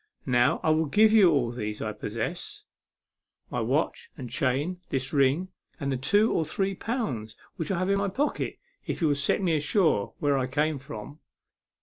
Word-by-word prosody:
Now, 125 +3 +3
I 155 - +3
will 155 0 +2
give 215 +8 +5
you 205 -5 +7
all 135 -7 +2
that 105 -3 -4
I 110 - -3
possess 105 +2 -5 0.9
my - - -1
watch - - -1
and 125 -2 -7
chain, 155 +5 -1
this 135 +1 -2
ring, 145 +6 +2 0.3
and 140 -3 -2
the - - 0
two 205 - +3
or 165 - +2
three 195 +5 -1
pounds 180 - -3 0.2
which 165 - -3
I 190 - 0
have 185 +2 0
in 200 - +2
my 200 0 0
pocket 280 +10 -1 0.3
if - - -2
you 165 -4 +2
will 145 - +2
set 140 +7 0
me 170 -3 +2
ashore 150 - +1
where 145 -2 +1
I 130 - -1
came 150 +2 0
from." 135 +1 -9
145 Hz, 190 wpm, -27 LUFS, 130-185 Hz, 0.9 s, you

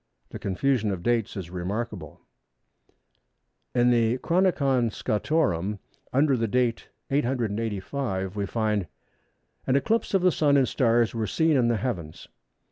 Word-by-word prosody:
The - - -8
confusion 110 +3 0
of 95 -3 -3
dates 115 -2 0
is 90 -3 -6
remarkable. 95 +6 -5 1.5
In 120 0 +4
the 115 0 +2
Chronicon 140 -7 +2
Scotorum, 105 - 0 0.3
under 140 +1 +3
the 115 -2 0
date 120 +1 0 0.2
of 140 - +3
885, 110 -4 -2
we 100 -1 -2
find:—"An 105 - -4
eclipse 220 +8 +1
of 190 - +2
the 185 - +5
Sun; 145 -3 +3
and 135 -2 +3
stars 120 -3 +2
were 110 -2 -2
seen 160 +4 +2
in 125 -3 +3
the 120 -1 +2
heavens." 90 -9 -5
120 Hz, 130 wpm, -26 LUFS, 105-135 Hz, 1.5 s, the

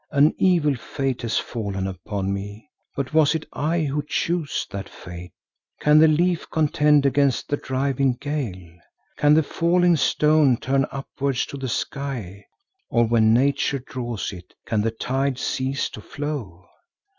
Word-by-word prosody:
An 145 +1 +4
evil 170 -6 +3
fate 135 0 -3
has 115 -2 -1
fallen 100 -5 -3
upon 95 +1 -3
me, 100 +3 -7 0.3
but 140 +1 -3
was 155 -1 +4
it 160 - -3
I 165 +3 0
who 145 0 -1
chose 160 +1 -1
that 100 -1 -6
fate? 90 -1 -10 0.5
Can 150 +1 +5
the 160 - +7
leaf 170 +2 +1
contend 150 -2 +3
against 140 -1 +2
the 145 - 0
driving 135 0 0
gale? 95 - -5 0.4
Can 150 0 +5
the 160 - +4
falling 175 +3 +2
stone 150 -3 +3
turn 135 +2 0
upwards 135 -1 -2
to 140 - -8
the 135 -1 -4
sky, 115 -8 -4 0.4
or 120 -1 +3
when 110 -1 +3
Nature 140 +3 +2
draws 120 -5 -5
it, 90 -1 -12
can 110 -2 0
the 115 - +1
tide 130 +4 -1
cease 135 +2 -1
to 110 - -9
flow? 115 - -6
135 Hz, 150 wpm, -23 LUFS, 110-150 Hz, 0.5 s, the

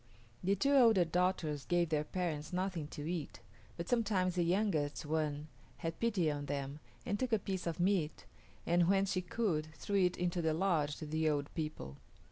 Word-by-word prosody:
The 195 +2 +3
two 275 +9 +2
older 225 -9 +6
daughters 170 -4 0
gave 175 -2 +1
their 150 -2 +1
parents 155 -3 -3
nothing 180 -4 -2
to 150 0 -6
eat, 165 -4 -4 0.4
but 170 0 -4
sometimes 200 -6 +1
the 180 - +1
youngest 170 -5 +1
one 150 -1 -1 0.3
had 165 -1 -4
pity 200 -9 +2
on 145 -1 -4
them 140 +1 -3 0.3
and 205 +1 -1
took 255 -2 -1
a - - +6
piece 190 -3 -3
of 170 +1 -3
meat 175 -4 +1 0.4
and, 175 0 +3
when 195 0 +4
she 185 -1 0
could, 175 -5 -1
threw 200 +6 -1
it 180 -2 +3
into 175 0 0
the 160 -1 +1
lodge 160 -5 +1
to 155 - -6
the 155 +1 +1
old 145 -1 -1
people. 150 - -5
175 Hz, 185 wpm, -35 LUFS, 150-190 Hz, 0.4 s, older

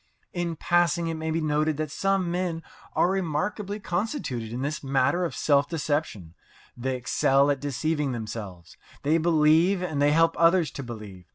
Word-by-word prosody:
In 175 -2 -2
passing, 175 0 +1
it - - -2
may 160 0 -4
be 160 +1 0
noted 155 0 0
that 155 -2 -3
some 195 0 0
men 175 -2 -2 0.3
are - - +3
remarkably 195 +4 -2
constituted 175 - -3
in 125 +3 -4
this 145 +2 -3
matter 135 +6 +1
of 170 - -4
self 145 -1 +2
deception. 145 - -2 0.4
They 130 +2 -2
excel 135 +3 +2
at 140 - -1
deceiving 145 +1 -1
themselves. 105 -7 -7 0.3
They 155 +3 +3
believe, 165 +3 +3
and 155 -5 -2
they 145 0 +4
help 165 +2 +3
others 165 -2 +4
to - - -6
believe. 105 -7 -9
155 Hz, 165 wpm, -26 LUFS, 135-170 Hz, 0.4 s, they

